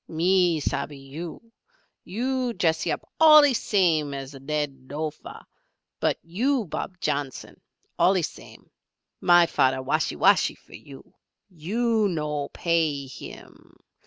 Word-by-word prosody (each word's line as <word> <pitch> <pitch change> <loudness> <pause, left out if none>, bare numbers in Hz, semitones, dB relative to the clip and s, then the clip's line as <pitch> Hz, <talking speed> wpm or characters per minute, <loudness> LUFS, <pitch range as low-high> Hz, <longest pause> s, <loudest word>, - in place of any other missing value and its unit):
Me 175 0 +2
shabbee 140 0 -3
you! 160 +11 -9 0.5
You 250 +4 -2
dressee 165 -5 0
up - - -2 0.2
allee 305 -3 +8
same 165 - +1
as 135 0 -7
Led 135 -1 -4
Lofer 150 +1 -6 0.5
but - - +1
you 235 +8 0
Bob 180 +2 -6
Johnson 140 -5 -4 0.4
allee 185 -1 +3
same. - - -9 0.5
My 175 -1 +5
fader 130 -4 +1
washee - - -1
washee - - +3
for - - -21
you. 135 -2 -13 0.4
You 215 +6 0
no 150 -4 -3
payee 160 -5 0
him. 130 - -12
165 Hz, 115 wpm, -25 LUFS, 145-195 Hz, 0.5 s, allee